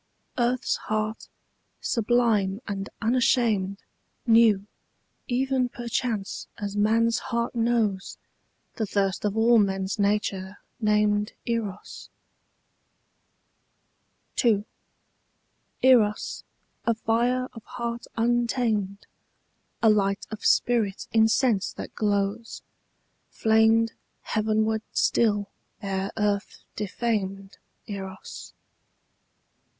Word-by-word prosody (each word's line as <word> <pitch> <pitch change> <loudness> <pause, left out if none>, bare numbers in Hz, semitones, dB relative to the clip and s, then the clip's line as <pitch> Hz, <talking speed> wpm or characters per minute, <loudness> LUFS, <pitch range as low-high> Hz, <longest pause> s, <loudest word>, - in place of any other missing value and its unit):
Earth's 245 +1 +1
heart, 215 0 -3 0.5
sublime 220 -4 +1
and 200 -1 -4
unashamed, 225 -5 +2 0.4
Knew, 225 -4 +5 0.6
even 260 0 +1
perchance 235 -4 -3
as 205 -1 -4
man's 225 +2 +2
heart 235 +1 -1
knows, 225 -5 0 0.6
The 220 - -1
thirst 195 0 0
of 205 +1 -1
all 230 +1 +5
men's 195 0 0
nature 200 -1 0 0.2
named 210 -1 +2
Eros. 220 -4 -4 2.3
II. 215 -4 +3 1.2
Eros, 230 -5 +3 0.4
a 230 - +1
fire 240 +3 +1
of 225 - -11
heart 235 0 -5
untamed, 230 -4 0 0.8
A 225 - +7
light 200 -1 +1
of 215 - -7
spirit 220 -5 +2
in 220 -1 +5
sense 225 -3 +2
that - - -8
glows, 205 +2 -1 0.7
Flamed 225 +1 +3 0.3
heavenward 220 0 0
still 205 -3 +2 0.3
ere 195 -1 -2
earth 205 -1 -1
defamed 195 -2 -3 0.3
Eros. 190 -2 -8
215 Hz, 85 wpm, -26 LUFS, 200-235 Hz, 2.3 s, A